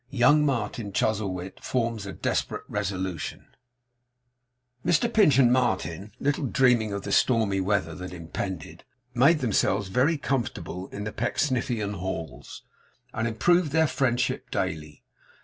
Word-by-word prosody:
YOUNG 145 +3 +4
MARTIN 110 -5 -2
CHUZZLEWIT 95 -3 -2
FORMS 115 -5 -1
A 95 - -6
DESPERATE - - -2
RESOLUTION 95 -4 -3 1.4
Mr 175 +8 +2
Pinch 175 - +5
and 125 -3 +5
Martin, 100 -6 -1
little 145 0 0
dreaming 120 -4 +3
of 100 -1 -4
the 100 - -4
stormy 110 -5 +3
weather 95 -4 0
that 90 +3 -7
impended, 85 -1 -6 0.3
made 140 +6 +4
themselves 100 -4 +1
very 135 - +2
comfortable 105 - -3
in 100 - -7
the 110 - -4
Pecksniffian 120 -4 -1
halls, 95 -4 -6 0.5
and 115 0 -1
improved 165 +8 +2
their 160 +1 +4
friendship 130 -3 0
daily. 75 -1 -3
110 Hz, 125 wpm, -26 LUFS, 95-130 Hz, 1.4 s, Pinch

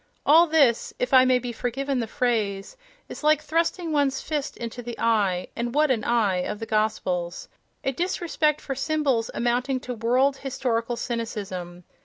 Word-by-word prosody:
All 330 +4 +7
this—if 270 -4 +2
I 260 0 +8
may 255 0 +4
be 245 -1 -4
forgiven 260 +3 -2
the 230 - -2
phrase—is 235 - -3
like 305 0 +4
thrusting 330 +2 -1
one's 280 -3 +1
fist 300 -2 -3
into 235 +1 -6
the 240 0 -7
eye 205 -6 +1
(and 240 +2 -3
what 300 -1 +4
an 225 -4 0
eye!) 220 -6 +2
of 195 +4 -3
the 225 - -5
Gospels: 185 -5 -1 0.4
a 270 - +1
disrespect 325 -1 0
for 275 - -4
symbols 275 -4 0
amounting 250 +2 0
to 250 - -5
world 250 +4 +2
historical 240 -3 -2
cynicism.... 195 -7 -5
245 Hz, 155 wpm, -25 LUFS, 225-280 Hz, 0.4 s, I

